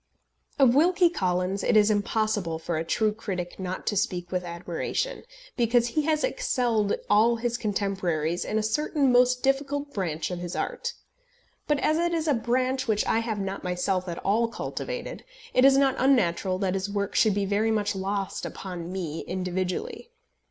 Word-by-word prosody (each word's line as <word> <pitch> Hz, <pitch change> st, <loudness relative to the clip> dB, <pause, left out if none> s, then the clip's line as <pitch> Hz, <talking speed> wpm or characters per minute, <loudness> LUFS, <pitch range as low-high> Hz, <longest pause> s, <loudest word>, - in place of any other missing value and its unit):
Of 265 Hz, -4 st, +5 dB
Wilkie 345 Hz, +4 st, +4 dB
Collins 185 Hz, -, -1 dB
it 230 Hz, -, +3 dB
is 210 Hz, 0 st, +5 dB
impossible 205 Hz, -4 st, 0 dB
for 165 Hz, +1 st, -3 dB
a 160 Hz, -, -1 dB
true 215 Hz, +5 st, +1 dB
critic 185 Hz, -5 st, -5 dB
not 185 Hz, 0 st, -4 dB
to 210 Hz, -, 0 dB
speak 185 Hz, -4 st, -1 dB
with 180 Hz, -1 st, -1 dB
admiration, 175 Hz, -, -3 dB, 0.3 s
because 240 Hz, 0 st, +2 dB
he 305 Hz, -, +1 dB
has 310 Hz, -1 st, +1 dB
excelled 245 Hz, -, +1 dB
all 220 Hz, +3 st, +4 dB
his 235 Hz, +1 st, -2 dB
contemporaries 190 Hz, -7 st, -1 dB
in 215 Hz, -, -2 dB
a 220 Hz, -, +1 dB
certain 275 Hz, +4 st, +1 dB
most 250 Hz, 0 st, +4 dB
difficult 285 Hz, +1 st, 0 dB
branch 160 Hz, -4 st, -2 dB
of 180 Hz, -, -4 dB
his 175 Hz, 0 st, -5 dB
art; -, -, -3 dB, 0.7 s
but 295 Hz, -, +2 dB
as 310 Hz, -, +2 dB
it 345 Hz, 0 st, +1 dB
is 320 Hz, -1 st, -1 dB
a 295 Hz, -, +4 dB
branch 255 Hz, +2 st, 0 dB
which 215 Hz, -2 st, +1 dB
I 225 Hz, -, +2 dB
have 225 Hz, -2 st, -2 dB
not 195 Hz, 0 st, -4 dB
myself 180 Hz, +1 st, -1 dB
at 170 Hz, -, -4 dB
all 225 Hz, +4 st, +3 dB
cultivated, -, -, -5 dB, 0.3 s
it 255 Hz, -, +4 dB
is 270 Hz, 0 st, +7 dB
not 275 Hz, -1 st, +4 dB
unnatural 195 Hz, -8 st, +2 dB
that 190 Hz, -1 st, 0 dB
his 195 Hz, +1 st, -2 dB
work 200 Hz, -1 st, -2 dB
should 215 Hz, -3 st, +3 dB
be 200 Hz, -1 st, 0 dB
very 205 Hz, +3 st, +1 dB
much 210 Hz, -1 st, 0 dB
lost 195 Hz, 0 st, -3 dB
upon 180 Hz, -2 st, -6 dB
me 165 Hz, -4 st, -4 dB
individually. 185 Hz, -, -3 dB
210 Hz, 175 wpm, -26 LUFS, 185-255 Hz, 0.7 s, is